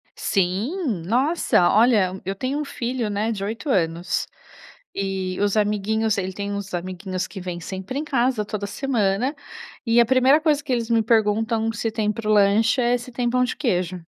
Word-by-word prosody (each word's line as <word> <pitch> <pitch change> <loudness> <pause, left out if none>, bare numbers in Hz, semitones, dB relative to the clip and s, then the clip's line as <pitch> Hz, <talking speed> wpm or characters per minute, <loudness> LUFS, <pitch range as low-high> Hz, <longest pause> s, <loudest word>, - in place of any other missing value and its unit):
Sim. 200 - -1
Nossa, 250 - +2
olha, 205 -4 +3
eu 195 +1 -2
tenho 260 +8 -2
um 300 - -3
filho, 240 -4 -3
né, 210 +3 -1
de 195 -3 -4
8 225 +8 -4
anos. 170 -5 0 0.7
E 190 -2 -3
os 205 0 +1
amiguinhos 210 +1 +1
ele 190 -1 -2
tem 200 +1 -4
uns 200 0 -5
amiguinhos 185 +1 -4
que 195 - -9
vêm 180 -1 -5
sempre 190 +9 -5
em - - -2
casa, 250 -6 +1
toda 210 -1 -4
semana. 245 +1 0 0.5
E 230 +1 +4
a 235 - +4
primeira 260 +5 +4
coisa 300 -2 +2
que 270 - -5
eles 235 -1 -1
me 230 -1 +3
perguntam, 225 0 +1
se 225 +1 -2
tem 215 -1 0
pro 215 0 -2
lanche, 215 +4 +4
é 245 +1 +2
se 245 +1 -10
tem 240 0 -1
pão 250 +1 +2
de 250 - -2
queijo. 185 - -1
215 Hz, 180 wpm, -23 LUFS, 195-245 Hz, 0.7 s, E